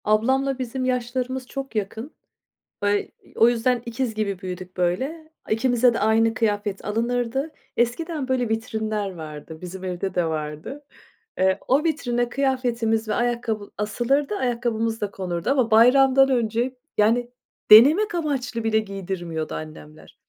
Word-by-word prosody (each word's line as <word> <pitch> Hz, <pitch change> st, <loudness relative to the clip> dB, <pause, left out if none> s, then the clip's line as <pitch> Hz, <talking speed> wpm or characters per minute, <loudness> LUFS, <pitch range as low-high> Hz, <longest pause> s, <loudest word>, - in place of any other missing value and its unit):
Ablamla 265 Hz, +5 st, +1 dB
bizim 255 Hz, +1 st, -3 dB
yaşlarımız 255 Hz, +1 st, -2 dB
çok 270 Hz, -3 st, -6 dB
yakın 220 Hz, +6 st, -3 dB, 0.7 s
ve 205 Hz, 0 st, +1 dB, 0.2 s
ı -, -, -20 dB
o 230 Hz, -, +8 dB
yüzden 240 Hz, +1 st, +1 dB
ikiz 235 Hz, 0 st, -2 dB
gibi 205 Hz, -3 st, -2 dB
büyüdük 185 Hz, -1 st, -7 dB
böyle, 265 Hz, -, -2 dB, 0.2 s
ikimize 245 Hz, +1 st, +3 dB
de -, -, -1 dB
aynı 225 Hz, +2 st, +3 dB
kıyafet 205 Hz, -3 st, -1 dB
alınırdı. 245 Hz, +6 st, -1 dB, 0.3 s
Eskiden, 270 Hz, +4 st, -1 dB
böyle, 255 Hz, -2 st, +1 dB
vitrinler 220 Hz, -3 st, -2 dB
vardı, 155 Hz, -1 st, -9 dB
bizim 185 Hz, +1 st, -8 dB
evde 185 Hz, +1 st, -3 dB
de 175 Hz, -, +1 dB
vardı. 155 Hz, -, -5 dB, 0.5 s
Eee, 190 Hz, +1 st, +3 dB
o 280 Hz, +4 st, +3 dB
vitrine 245 Hz, -7 st, 0 dB
kıyafetimiz 240 Hz, -5 st, 0 dB
ve 215 Hz, -, 0 dB
ayakkabı 235 Hz, -3 st, -1 dB
asılırdı, 240 Hz, -, 0 dB
ayakkabımız 230 Hz, -, -1 dB
da 205 Hz, -, -2 dB
konurdu 175 Hz, -4 st, -3 dB
ama 255 Hz, -5 st, +2 dB
bayramdan 265 Hz, +4 st, +6 dB
önce, 240 Hz, +1 st, 0 dB, 0.2 s
yani, 235 Hz, +3 st, +3 dB, 0.4 s
denemek 305 Hz, -, +8 dB
amaçlı 260 Hz, -8 st, -2 dB
bile 220 Hz, -1 st, +3 dB
giydirmiyordu 185 Hz, -6 st, -4 dB
annemler. 155 Hz, 0 st, -10 dB
230 Hz, 135 wpm, -23 LUFS, 205-255 Hz, 0.7 s, o